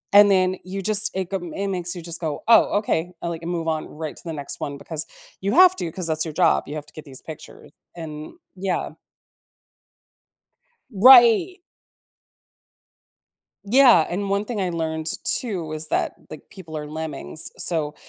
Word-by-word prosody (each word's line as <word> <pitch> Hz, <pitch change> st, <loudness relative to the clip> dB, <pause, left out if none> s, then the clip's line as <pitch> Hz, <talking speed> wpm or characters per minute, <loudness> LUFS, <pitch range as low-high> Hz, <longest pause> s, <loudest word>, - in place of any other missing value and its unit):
And 205 Hz, 0 st, +8 dB
then 185 Hz, -1 st, +2 dB
you 195 Hz, +2 st, -6 dB
just 215 Hz, +1 st, +4 dB
it 190 Hz, -2 st, -3 dB
go 195 Hz, -, 0 dB, 0.2 s
it 200 Hz, 0 st, -2 dB
makes 180 Hz, -2 st, -2 dB
you 175 Hz, -, -7 dB
just 170 Hz, 0 st, -4 dB
go, 155 Hz, -3 st, -4 dB
"Oh, 225 Hz, -2 st, +5 dB
okay," 180 Hz, -4 st, -2 dB
I -, -, -2 dB
like, 165 Hz, 0 st, -6 dB
move 170 Hz, -1 st, -3 dB
on 155 Hz, -1 st, -2 dB
right 155 Hz, 0 st, -7 dB
to -, -, -13 dB
the 165 Hz, -, -4 dB
next 145 Hz, -2 st, -4 dB
one 140 Hz, -1 st, -4 dB
because 160 Hz, +1 st, -5 dB, 0.4 s
you 200 Hz, +1 st, -1 dB
have 370 Hz, +1 st, +7 dB
to, 165 Hz, -, -4 dB
‘cause 180 Hz, -1 st, -4 dB
that's 155 Hz, 0 st, 0 dB
your 160 Hz, -, -6 dB
job; 175 Hz, -3 st, +3 dB
you 145 Hz, -, -6 dB
have 150 Hz, -1 st, -6 dB
to -, -, -21 dB
get 155 Hz, -, -10 dB
these 135 Hz, -2 st, -12 dB
pictures, 160 Hz, -2 st, -12 dB, 0.2 s
and 155 Hz, -2 st, -8 dB, 0.2 s
yeah. 185 Hz, -1 st, -3 dB, 2.0 s
Right. 245 Hz, -, +6 dB, 2.1 s
Yeah, 240 Hz, -, +6 dB
and 195 Hz, +2 st, -3 dB
one 200 Hz, +1 st, 0 dB
thing 215 Hz, -1 st, -5 dB
I 185 Hz, -, -1 dB
learned, 160 Hz, -1 st, -3 dB, 0.2 s
too, 185 Hz, -10 st, -2 dB
is 155 Hz, 0 st, -3 dB
that, -, -, -1 dB
like, 155 Hz, -, -12 dB
people 160 Hz, -6 st, -9 dB
are 150 Hz, -, -6 dB
lemmings, 155 Hz, 0 st, -5 dB
so 155 Hz, -4 st, -1 dB
170 Hz, 175 wpm, -22 LUFS, 155-200 Hz, 2.1 s, And